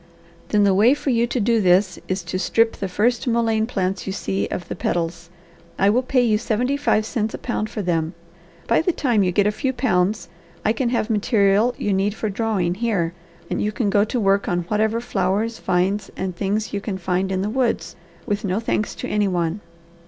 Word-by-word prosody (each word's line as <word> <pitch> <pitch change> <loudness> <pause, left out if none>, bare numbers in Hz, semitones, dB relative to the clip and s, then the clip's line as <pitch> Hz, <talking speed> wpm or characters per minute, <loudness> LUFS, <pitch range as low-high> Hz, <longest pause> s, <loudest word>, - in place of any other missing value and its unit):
"Then 210 -1 +3
the 200 -1 +4
way 220 +8 +5
for 290 - -2
you 235 0 +2
to 250 - -2
do 230 +1 +2
this 185 0 +3
is 185 -1 -2
to 180 +2 -3
strip 225 +3 +2
the 195 - -3
first 235 +7 0
mullein 225 -2 +1
plants 190 -5 -2
you - - -1
see 100 - -2
of 180 - -5
the - - -4
petals. 170 0 -2 0.5
I 195 +1 +4
will 245 +4 +3
pay 255 -1 +2
you 215 -3 +2
seventy 240 +4 0
five 215 -6 +1
cents 220 -2 -2
a - - -5
pound 215 -3 -3
for 215 -2 -4
them. 165 -1 -1 0.5
By 230 - +3
the 350 +2 0
time 240 -9 +1
you 185 -2 +2
get 200 +2 +2
a 210 - +3
few 260 +5 -1
pounds 205 -5 0 0.4
I 215 - +3
can 240 +1 -1
have 235 -2 0
material 210 +1 +2
you 205 - -1
need 195 +2 0
for 215 - -2
drawing 195 -4 0
here 190 -5 -1 0.3
and - - -2
you 210 - 0
can 210 -2 -1
go 205 0 +4
to 240 +3 -2
work 200 -1 +2
on 175 0 0
whatever 220 +2 +1
flowers, 210 +1 -1
vines, 190 +3 0
and 185 -1 -3
things 205 +4 -2
you 200 - -2
can 200 -2 -4
find 185 +1 -1
in 190 0 0
the 205 - -1
woods, 250 -1 -1 0.3
with 205 0 -2
no 195 0 0
thanks 215 -2 -1
to - - -5
any 210 -1 +1
one." 175 +1 -1
210 Hz, 215 wpm, -22 LUFS, 190-230 Hz, 0.5 s, way